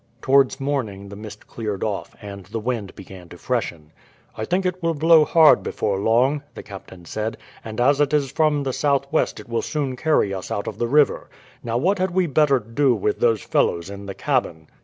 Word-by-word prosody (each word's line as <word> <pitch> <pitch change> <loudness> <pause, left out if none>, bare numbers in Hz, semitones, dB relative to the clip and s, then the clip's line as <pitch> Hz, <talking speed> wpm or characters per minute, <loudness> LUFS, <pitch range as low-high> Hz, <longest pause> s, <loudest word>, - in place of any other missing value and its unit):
Towards 135 +2 +3
morning 115 -9 -3
the 100 - -9
mist 105 0 -10
cleared 105 -4 -4
off, 105 -3 -4
and 100 -2 -9
the - - -5
wind 110 -4 -4
began 95 -2 -12
to 90 - -11
freshen. 85 -10 -3 0.4
"I 110 - -4
think 185 +6 0
it 185 0 -2
will 165 -1 0
blow 160 +1 +5
hard 160 -1 +6
before 95 -1 -2
long," 125 +7 +2
the - - -8
captain 95 -3 -11
said; 110 +5 -4 0.3
"and 110 0 -7
as 140 +4 +3
it 145 -1 +2
is 145 -4 +1
from 150 -2 +1
the 135 -2 -2
southwest 140 -1 0
it - - -11
will 115 -1 -1
soon 140 -4 -3
carry 125 -8 +1
us 95 -1 -6
out 100 - -3
of - - -6
the 120 - 0
river. 145 +3 +2 0.3
Now, 115 0 -1
what 185 +9 +1
had 185 +1 +1
we 185 +1 +1
better 150 -2 +3
do 120 +3 +1
with 105 0 -1
those 115 -4 +2
fellows 85 +2 0
in 100 0 -9
the 100 - -6
cabin?" 80 -1 -2
120 Hz, 205 wpm, -22 LUFS, 100-145 Hz, 0.4 s, hard